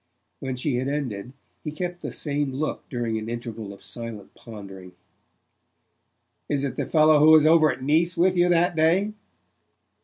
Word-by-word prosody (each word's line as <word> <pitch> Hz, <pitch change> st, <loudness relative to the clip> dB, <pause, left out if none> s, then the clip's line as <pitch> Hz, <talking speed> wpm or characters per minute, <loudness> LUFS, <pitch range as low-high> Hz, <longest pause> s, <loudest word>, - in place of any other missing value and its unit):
When 130 Hz, -1 st, -4 dB
she 125 Hz, 0 st, -1 dB
had 130 Hz, +2 st, -2 dB
ended 125 Hz, -7 st, -4 dB, 0.3 s
he 150 Hz, -, -4 dB
kept 175 Hz, +3 st, -5 dB
the -, -, -5 dB
same 145 Hz, -2 st, -2 dB
look 150 Hz, +4 st, -4 dB
during 115 Hz, -3 st, -2 dB
an 110 Hz, +1 st, -6 dB
interval 115 Hz, -3 st, -6 dB
of 100 Hz, -, -13 dB
silent 115 Hz, -4 st, -7 dB
pondering. 95 Hz, -4 st, -11 dB, 1.6 s
"Is 140 Hz, -2 st, 0 dB
it 135 Hz, -3 st, -3 dB
the -, -, -3 dB
fellow 155 Hz, -1 st, +5 dB
who 155 Hz, +2 st, +6 dB
was 155 Hz, -1 st, +7 dB
over 155 Hz, -1 st, +5 dB
at -, -, -7 dB
Nice 165 Hz, +5 st, +1 dB
with 180 Hz, +2 st, +3 dB
you 175 Hz, 0 st, +3 dB
that 175 Hz, 0 st, +2 dB
day?" 175 Hz, +7 st, +2 dB
145 Hz, 165 wpm, -24 LUFS, 115-160 Hz, 1.6 s, was